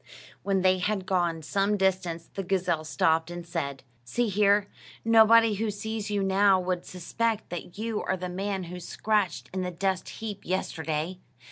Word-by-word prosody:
When 195 -2 0
they 185 0 +4
had 195 0 -1
gone 175 -4 0
some 200 +5 +1
distance, 180 -4 0
the 195 - -3
gazelle 180 -4 0
stopped, 160 +1 +1
and 175 0 -6
said, 140 -6 -4 0.2
"See 225 - 0
here: 200 0 +3 0.4
nobody 225 0 +6
who 215 +2 -1
sees 215 +1 -4
you 205 -1 0
now 195 0 +4
would 180 -1 -2
suspect 220 +5 -2
that 175 +1 -6
you 220 0 -2
are 190 - -1
the 180 0 -4
man 190 +1 -3
who 180 +1 -7
scratched 205 0 -1
in 190 - -1
the 180 - -2
dust 185 +1 -1
heap 210 -3 -6
yesterday. 165 -1 -2
190 Hz, 165 wpm, -27 LUFS, 175-205 Hz, 0.4 s, nobody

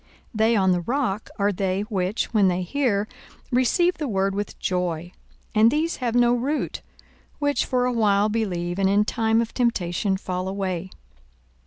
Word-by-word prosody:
42:008:013 - - -32 0.2
They 220 +1 +3
on 190 -3 +3
the 180 -1 +1
rock 230 0 -2
are 200 0 +2
they, 190 0 -1
which, 205 +1 -2
when 205 -3 +4
they 180 0 0
hear, 215 -1 0 0.4
receive 310 +9 +2
the 300 - -2
word 195 -3 0
with 205 +1 -4
joy; 175 -2 -2 0.4
and 220 +1 +6
these 310 +5 0
have 240 -2 -2
no 240 0 +4
root, 270 +5 -2 0.6
which 285 -1 0
for 250 -1 +1
a 250 - 0
while 210 -3 +3
believe, 185 -5 -2
and 190 -1 +3
in 205 +1 +3
time 225 +1 +1
of 230 - -4
temptation 195 -5 0
fall 185 -1 -4
away. 190 -2 -3
205 Hz, 170 wpm, -24 LUFS, 190-240 Hz, 0.6 s, and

